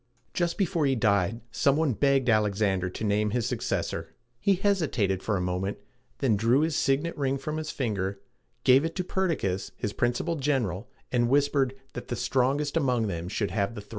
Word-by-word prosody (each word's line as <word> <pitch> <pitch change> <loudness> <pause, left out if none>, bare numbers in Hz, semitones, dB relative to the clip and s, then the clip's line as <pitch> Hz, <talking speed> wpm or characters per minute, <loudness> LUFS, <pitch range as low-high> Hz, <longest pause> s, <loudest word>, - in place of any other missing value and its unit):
Just 170 -1 0
before 175 -6 +1
he 135 - +2
died, 105 -1 +1
some 140 +4 +2
one 155 -4 +1
begged 135 +4 +2
Alexander 100 -4 +2
to 90 - -7
name 105 0 +1
his 115 +1 -1
successor. - - -3 0.2
He 200 +7 +3
hesitated 155 - +1
for 105 -2 0
a - - -2
moment, 90 +2 -2 0.4
then 125 -6 +2
drew 115 +7 +3
his 160 -1 0
signet 145 +6 +1
ring 135 -1 0
from 155 +3 -4
his 155 -1 -4
finger, 100 -6 -2 0.4
gave 130 +2 +6
it 165 - -3
to 185 - -1
Per 190 +1 0
dic´cas, 95 - -1
his 105 - -3
principal 125 +10 0
general, 125 -9 -1 0.2
and 120 -1 +2
whispered 140 -1 +2 0.2
that - - -7
the 120 - -2
strongest 135 +4 0
among 125 -7 +2
them 85 -1 -4
should 105 0 -2
have 100 +1 -1
the 105 - -6
throne. 105 - -21
125 Hz, 190 wpm, -27 LUFS, 105-145 Hz, 0.4 s, gave